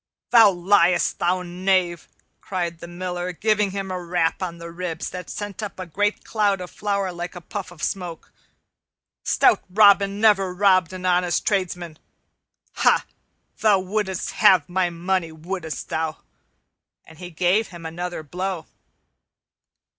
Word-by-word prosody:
"Thou 225 -3 +8
liest, 180 -1 +2
thou 180 +1 +1
knave," 180 -1 0 0.3
cried 175 -3 -3
the 170 - -9
Miller, 180 0 -4
giving 210 +3 +1
him 195 0 -4
a 180 -1 -3
rap 170 -1 0
on 175 -2 -4
the 170 0 -8
ribs 170 -1 -4
that 180 -1 -7
sent 205 0 -6
up 205 -3 -6
a 185 - -4
great 205 +6 -1
cloud 205 -3 +1
of 180 -1 -7
flour 200 -2 -1
like 175 +1 -6
a - - -6
puff 190 +3 -6
of 175 -3 -12
smoke. 175 -4 -4 0.9
"Stout - - +3
Robin 200 0 +5
never 195 -4 +3
robbed 185 -3 +3
an 185 0 -7
honest 180 -1 +1
tradesman. 180 -5 -2 0.8
Ha! - - +3 0.5
thou 210 -3 +4
wouldst 190 0 -2
have 180 -6 +5
my 180 0 0
money, 170 0 -1
wouldst 160 0 -6
thou?" 160 0 -2 0.9
And 160 0 -16
he 180 -1 -7
gave 180 +6 +1
him 170 -2 -11
another 175 0 -5
blow. 180 +2 -4
180 Hz, 145 wpm, -23 LUFS, 175-195 Hz, 0.9 s, Thou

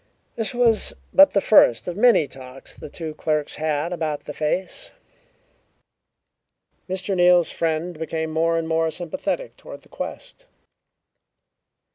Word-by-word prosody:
This 225 -2 -2
was 235 -3 +2 0.2
but 290 0 +7
the 200 - +4
first 120 - +4
of 175 - -3
many 220 -8 +4
talks 130 0 -10
the - - -10
two 160 +1 -6
clerks 150 -1 -2
had 155 +2 -1
about 155 -3 -3
the - - -8
face. 185 - -2 2.0
Mr. 190 +1 -2
Neal's 175 -2 +4
friend 165 +1 -2
became 160 0 -3
more 165 +1 +1
and 165 -1 -2
more 160 0 +1
sympathetic 230 - -4
toward - - -11
the - - -22
quest. - - -8
165 Hz, 130 wpm, -23 LUFS, 155-190 Hz, 2.0 s, but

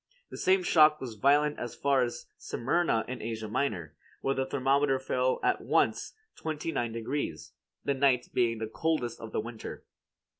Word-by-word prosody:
The - - -7
same 185 0 +3
shock 155 -3 +5
was 125 -4 -6
violent 145 +6 +3
as 120 - -5
far 140 -2 +2
as 120 -1 -2
Smyrna 130 -2 0
in 125 0 -5
Asia 110 -1 -4
Minor, 100 - -2 0.3
where 135 - +1
the 135 -1 -1
thermometer 135 0 +2
fell 130 -1 0
at - - +2
once - - +1 0.2
twenty 160 +1 -3
nine 120 -5 -1
degrees, 115 - -3 0.3
the 140 - +2
night 130 -2 +2
being 115 -2 +2
the 110 - -3
coldest 125 0 -1
of 115 -1 -8
the - - -1
winter. 115 0 -8
130 Hz, 165 wpm, -29 LUFS, 115-145 Hz, 0.3 s, shock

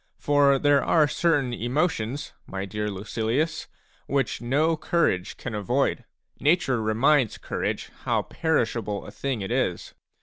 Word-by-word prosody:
For 145 -1 +4
there 145 0 +3
are 155 -3 +4
certain 145 -6 +1
emotions, 130 +1 -1
my 95 0 -4
dear 105 +1 -3
Lucilius, 115 - -2 0.4
which 135 -4 0
no 150 +7 +2
courage 130 - 0
can 120 - -6
avoid; 105 -3 0 0.3
nature 140 -5 +2
reminds 120 +3 +2
courage - - -3
how - - +1
perishable 115 - -1
a - - -9
thing 135 -6 -3
it 95 - -4
is. - - -1
130 Hz, 130 wpm, -25 LUFS, 110-150 Hz, 0.4 s, For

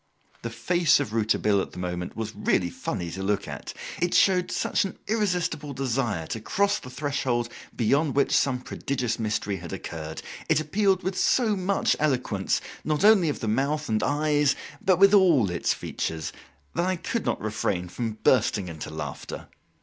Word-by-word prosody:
The 115 - -4
face 170 +8 +3
of 105 - -3
Rouletabille 105 -2 +2
at - - -6
the - - -11
moment 90 0 -4
was 110 -1 -3
really 90 -4 +1
funny 85 0 -4
to 95 - -5
look 100 +1 0
at. - - -6 0.3
It 175 0 +1
showed 185 -2 +4
such - - +1
an 195 - -5
irresistible 180 -9 -1
desire 120 -9 -1
to 110 - -4
cross 200 - +1
the 125 - -10
threshold 130 -3 -1 0.3
beyond 140 +5 +2
which 140 - +3
some 125 -3 +2
prodigious 125 -3 -2
mystery 105 -2 -1
had 85 -2 -8
occurred; 80 -1 -6 0.3
it - - +4
appealed 190 +4 +1
with 190 0 -2
so 220 +1 +3
much 190 +1 +1
eloquence, 125 -9 0 0.2
not 155 +5 +1
only 205 -7 +6
of 145 - -3
the 110 - -2
mouth 140 +7 0
and 110 -1 +1
eyes, 145 0 +2 0.3
but 185 -2 +4
with 195 +1 +6
all 165 - +5
its 85 - 0
features, 80 -1 -3 0.4
that 175 - 0
I 185 - +1
could 220 +6 -3
not - - -1
refrain 105 -4 -2
from 115 +5 -3
bursting 105 -7 +3
into 80 -2 -7
laughter. 75 0 -6
130 Hz, 170 wpm, -26 LUFS, 105-175 Hz, 0.4 s, only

